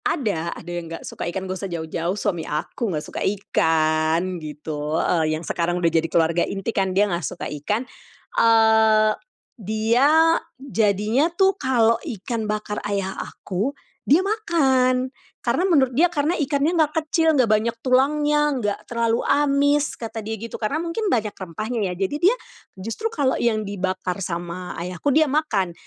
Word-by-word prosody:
Ada 205 Hz, -, -1 dB
ada 175 Hz, -, -9 dB
yang 170 Hz, -1 st, -5 dB
nggak 165 Hz, -, -7 dB
suka -, -, -5 dB
ikan, 190 Hz, +2 st, -4 dB
nggak 185 Hz, 0 st, -4 dB
usah 195 Hz, -, -4 dB
jauh-jauh 170 Hz, +2 st, -3 dB
suami 195 Hz, -5 st, -1 dB
aku 160 Hz, +9 st, -3 dB
nggak 155 Hz, -4 st, -3 dB
suka -, -, -6 dB
ikan, 160 Hz, -2 st, +1 dB
gitu. 150 Hz, 0 st, -4 dB
Heeh, 155 Hz, -3 st, +1 dB
yang 165 Hz, -, -8 dB
sekarang 175 Hz, +1 st, -1 dB
udah 170 Hz, -2 st, +2 dB
jadi 165 Hz, 0 st, +1 dB
keluarga 165 Hz, +1 st, +2 dB
inti 195 Hz, +3 st, -2 dB
kan, 195 Hz, -1 st, +1 dB
dia 195 Hz, +3 st, +3 dB
nggak 175 Hz, -4 st, -2 dB
suka 180 Hz, -, -5 dB, 0.2 s
ikan, 210 Hz, -, -1 dB, 0.5 s
eee, 220 Hz, -1 st, +5 dB, 0.5 s
dia 220 Hz, +6 st, +2 dB, 0.5 s
jadinya 225 Hz, -, +1 dB
tuh, 385 Hz, 0 st, +4 dB
kalau 240 Hz, -, +2 dB
ikan 220 Hz, +1 st, -4 dB
bakar 210 Hz, 0 st, -3 dB
ayah 195 Hz, -1 st, -1 dB
aku, 215 Hz, +10 st, -4 dB, 0.2 s
dia 330 Hz, +8 st, +3 dB
makan. 265 Hz, -, +1 dB, 0.3 s
Karena 365 Hz, -, +1 dB
menurut 270 Hz, -7 st, +3 dB
dia, 335 Hz, -, +6 dB
karena 305 Hz, 0 st, 0 dB
ikannya 290 Hz, +2 st, +1 dB
enggak 310 Hz, -2 st, +2 dB
kecil, 320 Hz, +1 st, +2 dB
enggak 255 Hz, -6 st, +3 dB
banyak 215 Hz, +2 st, +2 dB
tulangnya, 295 Hz, +4 st, +3 dB, 0.2 s
enggak 205 Hz, -4 st, -1 dB
terlalu 235 Hz, -1 st, +1 dB
amis, 285 Hz, +1 st, +2 dB
kata 225 Hz, -1 st, -6 dB
dia 220 Hz, +1 st, -4 dB
gitu. 230 Hz, +2 st, -7 dB
Karena 225 Hz, +8 st, 0 dB
mungkin 365 Hz, +6 st, -2 dB
banyak 215 Hz, -, 0 dB
rempahnya, 215 Hz, +6 st, -4 dB
ya. 185 Hz, -3 st, -1 dB
Jadi 200 Hz, -, -2 dB
dia, -, -, +2 dB, 0.4 s
justru 225 Hz, -, -3 dB
kalau 285 Hz, -11 st, +1 dB
yang 220 Hz, -3 st, 0 dB
dibakar 185 Hz, -1 st, -3 dB
sama 175 Hz, 0 st, -4 dB
Ayahku, 180 Hz, -, -3 dB
dia 310 Hz, +2 st, +5 dB
makan. 230 Hz, -, 0 dB
215 Hz, 160 wpm, -23 LUFS, 180-270 Hz, 0.5 s, dia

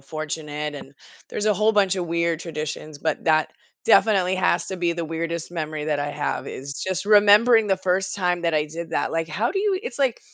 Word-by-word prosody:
fortunate 150 Hz, 0 st, -5 dB
and 135 Hz, -1 st, -11 dB, 0.4 s
there's 210 Hz, -, -3 dB
a 215 Hz, -, +4 dB
whole 215 Hz, +3 st, +2 dB
bunch 195 Hz, -3 st, +2 dB
of 180 Hz, -2 st, -2 dB
weird 170 Hz, 0 st, 0 dB
traditions, 155 Hz, -2 st, -6 dB
but 160 Hz, -, -2 dB
that 155 Hz, -1 st, +3 dB, 0.4 s
definitely 195 Hz, -5 st, +4 dB
has 180 Hz, -1 st, +1 dB
to 190 Hz, -, -5 dB
be 175 Hz, -1 st, 0 dB
the 170 Hz, 0 st, -4 dB
weirdest 165 Hz, +1 st, -4 dB
memory 155 Hz, -3 st, -4 dB
that 150 Hz, -1 st, 0 dB
I 145 Hz, 0 st, -2 dB
have 145 Hz, 0 st, -3 dB
is 140 Hz, +2 st, -7 dB
just 185 Hz, 0 st, -2 dB
remembering 210 Hz, +2 st, +6 dB
the 195 Hz, -2 st, +2 dB
first 185 Hz, +1 st, -1 dB
time 180 Hz, -3 st, 0 dB
that 165 Hz, -2 st, +1 dB
I 150 Hz, 0 st, +1 dB
did 165 Hz, +2 st, -7 dB
that, -, -, -1 dB
like, 165 Hz, 0 st, -1 dB
how 205 Hz, +9 st, -1 dB
do 390 Hz, -, -2 dB
you 395 Hz, -2 st, +1 dB
it's 480 Hz, -, -6 dB
like 265 Hz, -4 st, +1 dB
170 Hz, 215 wpm, -23 LUFS, 155-200 Hz, 0.4 s, remembering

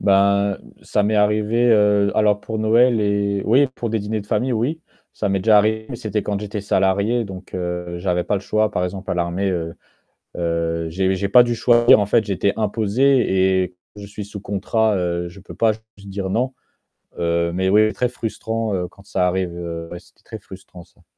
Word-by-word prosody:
Bah, 100 Hz, 0 st, +3 dB
heu, -, -, -18 dB
ça 105 Hz, -, 0 dB
m'est 105 Hz, +2 st, +1 dB
arrivé, 105 Hz, +3 st, +2 dB
heu, 105 Hz, -2 st, +4 dB
alors, 105 Hz, -1 st, +3 dB
pour 110 Hz, -1 st, -5 dB
Noël 115 Hz, +2 st, +3 dB
et 100 Hz, -1 st, 0 dB
oui, 130 Hz, +6 st, +4 dB
pour 115 Hz, -2 st, -4 dB
des 110 Hz, -, 0 dB
dîners 105 Hz, +1 st, -3 dB
de 105 Hz, -, -19 dB
famille, 110 Hz, +5 st, 0 dB
oui, 130 Hz, +9 st, -1 dB, 0.3 s
ça 105 Hz, -, -2 dB
m'est 95 Hz, -1 st, 0 dB
déjà 110 Hz, 0 st, +5 dB
arrivé 110 Hz, +1 st, +1 dB
mais 120 Hz, -, -5 dB
c'était 110 Hz, -3 st, -3 dB
quand 100 Hz, -1 st, -3 dB
j'étais 105 Hz, -1 st, -5 dB
salarié 100 Hz, +4 st, +1 dB
donc, 95 Hz, -2 st, -10 dB
heu, 90 Hz, -1 st, -4 dB
j'avais 90 Hz, -1 st, -1 dB
pas -, -, -1 dB
le 100 Hz, -, -1 dB
choix. 110 Hz, +1 st, 0 dB
Par 90 Hz, -, -2 dB
exemple 95 Hz, +1 st, -5 dB
à -, -, 0 dB
l'armée, 90 Hz, +3 st, -1 dB
heu, 85 Hz, -2 st, -3 dB, 0.6 s
heu, 85 Hz, -1 st, -1 dB
j'ai 95 Hz, +3 st, 0 dB
j'ai 100 Hz, +1 st, -2 dB
pas 125 Hz, +4 st, +8 dB
dû 120 Hz, -1 st, 0 dB
choisir 120 Hz, -1 st, +5 dB
en 105 Hz, -, +1 dB
fait, 110 Hz, +2 st, +2 dB
j'étais 100 Hz, 0 st, 0 dB
imposé 105 Hz, -3 st, +2 dB
et 90 Hz, 0 st, -7 dB, 0.2 s
je 100 Hz, -1 st, -9 dB
suis 105 Hz, +1 st, -8 dB
sous 100 Hz, 0 st, -9 dB
contrat, 105 Hz, +2 st, 0 dB
heu, 85 Hz, -1 st, -2 dB
je 85 Hz, +3 st, -12 dB
peux 95 Hz, -, -12 dB
pas 115 Hz, -1 st, +3 dB
juste 110 Hz, -2 st, -16 dB
dire 95 Hz, -1 st, -4 dB
non. 125 Hz, +6 st, -1 dB, 0.6 s
Heu, 85 Hz, 0 st, 0 dB
mais 95 Hz, +1 st, 0 dB
oui, 110 Hz, +2 st, +4 dB
très 125 Hz, -1 st, -1 dB
frustrant, 115 Hz, -2 st, -3 dB
heu, 90 Hz, -1 st, -2 dB
quand 100 Hz, -, -20 dB
ça 90 Hz, -2 st, 0 dB
arrive, 90 Hz, -1 st, -1 dB
heu, 85 Hz, -1 st, -6 dB
ouais 85 Hz, -, -7 dB
c'était 90 Hz, -, -25 dB
très 110 Hz, -, -9 dB
frustrant 95 Hz, -3 st, -13 dB
ça. 85 Hz, -, -27 dB
100 Hz, 210 wpm, -20 LUFS, 95-110 Hz, 0.6 s, pas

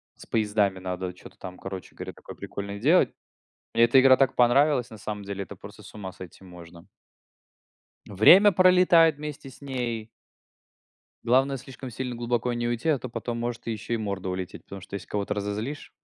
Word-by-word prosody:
с -, -, -14 dB
поездами 105 Hz, -3 st, 0 dB
надо 90 Hz, 0 st, -4 dB
чё-то 90 Hz, -, -15 dB
там, 90 Hz, 0 st, -9 dB
короче 95 Hz, -1 st, -8 dB
говоря, -, -, -7 dB
такое -, -, -12 dB
прикольное 100 Hz, 0 st, -6 dB
делать. 155 Hz, -, +4 dB, 0.6 s
Мне 115 Hz, -, +5 dB
эта 120 Hz, +3 st, +6 dB
игра 130 Hz, 0 st, +7 dB
так 135 Hz, -1 st, +1 dB
понравилась, 125 Hz, +1 st, +3 dB
на 110 Hz, -, -11 dB
самом 105 Hz, 0 st, -6 dB
деле, 100 Hz, 0 st, -5 dB
это -, -, -11 dB
просто -, -, -12 dB
с -, -, -14 dB
ума 95 Hz, -3 st, -7 dB
сойти 90 Hz, +1 st, -12 dB
можно. 85 Hz, -2 st, -13 dB, 1.2 s
Время 175 Hz, -, +7 dB
пролетает 180 Hz, -3 st, +5 dB
вместе 150 Hz, -1 st, -7 dB
с 130 Hz, -, -17 dB
ней. 120 Hz, -5 st, -4 dB, 1.2 s
Главное 135 Hz, +3 st, +2 dB
слишком 130 Hz, 0 st, -9 dB
сильно 125 Hz, +1 st, -5 dB
глубоко 120 Hz, 0 st, -1 dB
не 120 Hz, 0 st, -2 dB
уйти, 120 Hz, +6 st, -1 dB
а 145 Hz, -4 st, +2 dB
то 130 Hz, -, -7 dB
потом 115 Hz, +1 st, -4 dB
может 120 Hz, 0 st, -4 dB
еще 115 Hz, +1 st, -3 dB
и -, -, -1 dB
морда 100 Hz, -3 st, -4 dB
улететь, 90 Hz, -1 st, -5 dB
потому 100 Hz, 0 st, -10 dB
что 95 Hz, -, -15 dB
если 100 Hz, -, -6 dB
кого-то 105 Hz, 0 st, -2 dB
разозлишь. 105 Hz, +8 st, -4 dB
115 Hz, 180 wpm, -26 LUFS, 100-135 Hz, 1.2 s, игра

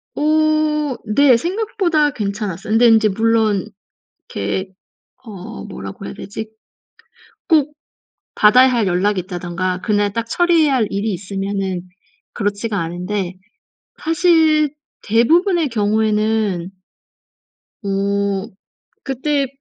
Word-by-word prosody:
어. 305 Hz, -2 st, +1 dB
네 250 Hz, +3 st, +4 dB
생각보다 345 Hz, -, 0 dB
괜찮았어요. 205 Hz, -2 st, -4 dB
근데 235 Hz, +2 st, +5 dB
인제 220 Hz, -1 st, +5 dB
물론 220 Hz, -1 st, +1 dB, 0.6 s
이렇게 105 Hz, -, -3 dB, 0.6 s
어 215 Hz, +1 st, -9 dB
뭐라고 200 Hz, -1 st, -8 dB
해야 -, -, -7 dB
되지? 215 Hz, +2 st, -7 dB, 1.0 s
꼭 300 Hz, -3 st, +3 dB, 0.6 s
받아야 250 Hz, +5 st, +6 dB
할 235 Hz, -5 st, +1 dB
연락이 190 Hz, +2 st, +1 dB
있다든가 180 Hz, 0 st, -3 dB
그날 205 Hz, -2 st, +1 dB
딱 230 Hz, +1 st, -3 dB
처리해야 330 Hz, -3 st, +3 dB
할 225 Hz, -5 st, +2 dB
일이 205 Hz, +2 st, -1 dB
있으면은 195 Hz, -1 st, -3 dB, 0.5 s
그렇지가 205 Hz, 0 st, -2 dB
않은데 180 Hz, +2 st, -3 dB, 0.7 s
사실 320 Hz, -3 st, +3 dB, 0.3 s
대부분의 330 Hz, -, +3 dB
경우에는 215 Hz, -3 st, 0 dB, 1.1 s
어 200 Hz, 0 st, -1 dB, 0.6 s
그때 275 Hz, +1 st, -1 dB
220 Hz, 225 characters per minute, -18 LUFS, 195-290 Hz, 1.1 s, 받아야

